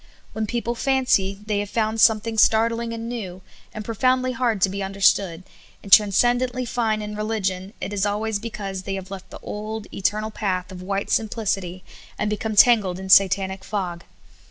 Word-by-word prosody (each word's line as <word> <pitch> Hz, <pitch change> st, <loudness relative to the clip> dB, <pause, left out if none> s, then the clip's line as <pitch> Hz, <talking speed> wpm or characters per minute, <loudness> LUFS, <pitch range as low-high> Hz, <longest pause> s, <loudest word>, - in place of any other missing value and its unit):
When 220 Hz, -1 st, -2 dB
people 235 Hz, +1 st, -2 dB
fancy 240 Hz, -7 st, +1 dB
they 210 Hz, -1 st, -1 dB
have 205 Hz, -1 st, -3 dB
found 220 Hz, 0 st, 0 dB
something 220 Hz, 0 st, +3 dB
start 225 Hz, +2 st, +4 dB
ling 230 Hz, 0 st, -4 dB
and 230 Hz, 0 st, -5 dB
new, 190 Hz, -7 st, -6 dB, 0.3 s
and 215 Hz, -1 st, -7 dB
profoundly 255 Hz, +3 st, +1 dB
hard 235 Hz, -4 st, 0 dB
to 195 Hz, -, +4 dB
be 200 Hz, +1 st, -4 dB
understood, 195 Hz, -2 st, +1 dB, 0.4 s
and 200 Hz, -, -11 dB
transcendently 245 Hz, +5 st, +4 dB
fine 220 Hz, -3 st, -1 dB
in 210 Hz, 0 st, -6 dB
religion, 200 Hz, -3 st, -2 dB
it 205 Hz, -, -5 dB
is 195 Hz, -1 st, -1 dB
always 210 Hz, +1 st, -1 dB
because 205 Hz, -4 st, -5 dB
they 195 Hz, +1 st, -4 dB
have 190 Hz, 0 st, -8 dB
left 195 Hz, -1 st, -8 dB
the -, -, -9 dB
old, 215 Hz, +1 st, -5 dB
eternal 215 Hz, +3 st, -1 dB
path 185 Hz, -3 st, -3 dB
of 180 Hz, -1 st, -9 dB
white 195 Hz, +2 st, -3 dB
simplicity 195 Hz, -5 st, -1 dB, 0.3 s
and 210 Hz, 0 st, -1 dB
become 215 Hz, 0 st, -3 dB
tangled 205 Hz, -5 st, +5 dB
in 190 Hz, 0 st, -7 dB
Satanic 190 Hz, 0 st, +4 dB
fog. 180 Hz, -4 st, -4 dB
210 Hz, 175 wpm, -23 LUFS, 195-225 Hz, 0.4 s, tangled